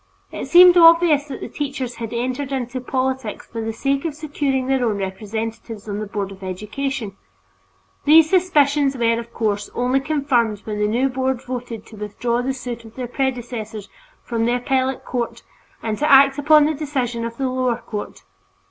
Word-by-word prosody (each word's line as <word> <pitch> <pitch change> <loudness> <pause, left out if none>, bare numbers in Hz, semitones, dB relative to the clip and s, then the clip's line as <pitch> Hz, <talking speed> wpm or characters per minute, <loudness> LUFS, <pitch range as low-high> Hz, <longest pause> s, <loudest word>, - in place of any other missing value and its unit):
It - - -5
seemed 360 0 +8
obvious 330 -3 +6
that 280 - -8
the - - -4
teachers 270 -4 -4
had 230 -2 -5
entered 255 +4 -3
into 255 -1 -3
politics 260 -3 -2
for 230 - -6
the 225 0 -2
sake 275 +4 -1
of 325 -4 -3
securing 285 -3 -1
their 265 -1 +1
own 220 -4 0
representatives 220 +2 -5
on 205 0 -3
the 215 - -4
Board 200 -1 -4
of 195 0 -12
Education. 210 +4 -4 0.9
These 315 +2 +7
suspicions 295 -6 +2
were, 230 -1 +2
of 235 0 -9
course, 210 -3 -2
only 250 +2 +1
confirmed 270 -8 0
when 210 -1 -5
the 210 - +2
new 240 +5 +1
board 260 -1 -2
voted 245 -3 -6
to 220 - -13
withdraw 235 +4 -2
the 260 +2 -1
suit 245 -2 -6
of 225 0 -14
their 255 - -4
predecessors 240 -5 -4 0.3
from 230 -1 -1
the 240 +1 +2
Appellate 260 +1 -1
Court 240 -2 -3 0.4
and 220 -2 -2
to 300 - +2
act 275 +1 +6
upon 300 +1 +6
the 310 - +1
decision 265 -6 -2
of 230 0 -5
the 270 - -1
lower 255 -2 0
court. 215 -3 -7
250 Hz, 180 wpm, -21 LUFS, 225-275 Hz, 0.9 s, seemed